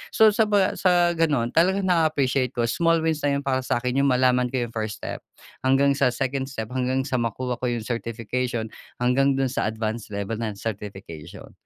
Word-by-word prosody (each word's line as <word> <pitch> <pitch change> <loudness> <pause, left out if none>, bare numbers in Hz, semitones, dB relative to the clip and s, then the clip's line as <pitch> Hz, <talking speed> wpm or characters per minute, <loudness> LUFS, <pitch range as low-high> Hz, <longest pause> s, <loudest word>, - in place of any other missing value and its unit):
So, 220 -1 +7
sa 215 +1 +2
pag, 205 -2 +3
ah, - - -8
sa 175 -2 +4
gano'n 150 -8 +1
talagang 190 +4 +2
na-appreciate 140 -6 +1
ko 120 - 0
small 165 +6 +2
wins 160 -2 0
na 140 -1 +1
yun 140 - -3
para 130 -1 0
sa'kin 125 +1 -1
yung 140 - +3
malaman 125 -1 +3
ko 125 -1 -2
yung 120 - -6
first 110 -2 -5
step, - - -4 0.4
hanggang 135 +2 +3
sa 140 -1 +2
second 130 +2 -2
step, 110 -4 -6
hanggang 130 +1 0
sa 130 -2 -1
makuha 120 +2 -3
ko 125 - -1
yung 120 -2 -2
certification, 115 0 -3 0.2
hanggang 135 +3 +2
dun 135 -2 0
sa 120 - -1
advance 110 0 -3
level 100 +2 -4
ng 110 -3 -3
certification. 100 -7 -7
130 Hz, 195 wpm, -24 LUFS, 115-140 Hz, 0.4 s, So